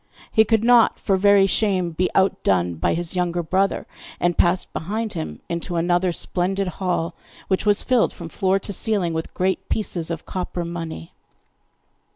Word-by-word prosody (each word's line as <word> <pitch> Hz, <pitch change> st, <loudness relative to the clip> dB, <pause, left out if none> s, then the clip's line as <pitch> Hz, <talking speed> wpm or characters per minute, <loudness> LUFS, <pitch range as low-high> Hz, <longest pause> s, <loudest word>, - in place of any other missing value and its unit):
He 220 Hz, -1 st, +5 dB
could 220 Hz, 0 st, +2 dB
not 240 Hz, -1 st, +5 dB
for 195 Hz, -, +1 dB
very 200 Hz, 0 st, +5 dB
shame 190 Hz, -3 st, +1 dB
be 180 Hz, +3 st, 0 dB
outdone 95 Hz, -, +2 dB
by 80 Hz, -, +1 dB
his 170 Hz, +2 st, -4 dB
younger 175 Hz, -1 st, 0 dB
brother, 190 Hz, +4 st, 0 dB, 0.3 s
and 175 Hz, -1 st, +1 dB
passed 175 Hz, +1 st, +1 dB
behind 215 Hz, +6 st, -3 dB
him 75 Hz, -1 st, -5 dB
into 170 Hz, +1 st, -4 dB
another 175 Hz, +2 st, +2 dB
splendid 190 Hz, +3 st, -1 dB
hall, 180 Hz, -1 st, -2 dB, 0.4 s
which 190 Hz, +2 st, 0 dB
was 205 Hz, 0 st, +3 dB
filled 250 Hz, -3 st, +2 dB
from 170 Hz, -, -9 dB
floor 190 Hz, +3 st, +1 dB
to 200 Hz, +1 st, -5 dB
ceiling 195 Hz, -4 st, 0 dB
with 160 Hz, 0 st, -4 dB
great 185 Hz, +1 st, -1 dB
pieces 175 Hz, -6 st, -1 dB
of 165 Hz, -2 st, -5 dB
copper 180 Hz, -1 st, -4 dB
money. 165 Hz, -, -6 dB
180 Hz, 165 wpm, -22 LUFS, 170-195 Hz, 0.4 s, He